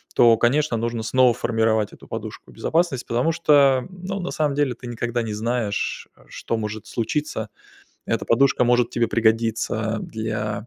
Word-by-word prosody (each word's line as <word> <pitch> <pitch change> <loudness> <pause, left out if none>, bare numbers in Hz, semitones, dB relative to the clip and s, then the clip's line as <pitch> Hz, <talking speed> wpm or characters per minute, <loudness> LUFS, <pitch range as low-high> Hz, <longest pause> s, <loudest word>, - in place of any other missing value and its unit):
То, 120 -1 +6
конечно, 130 +3 +2
нужно 115 0 -2
снова 125 +1 +4
формировать 110 -2 0
эту - - -15
подушку - - -7
безопасность, 160 -6 0
потому 125 +7 +1
что, 140 -5 +4
ну, 185 +1 -6
на 180 - -4
самом 150 -2 0
деле 145 -3 +1
ты 120 +1 -11
никогда 120 0 -2
не 110 -2 -4
знаешь, 110 -1 -2
э, - - -21
что 115 - -4
может 105 -1 -5
случиться. 145 +6 -3 0.6
Эта - - -1
подушка 125 +1 +3
может 120 -1 +2
тебе 120 -1 +1
пригодиться 115 0 0
для 110 -1 -4
120 Hz, 160 wpm, -23 LUFS, 110-135 Hz, 0.6 s, То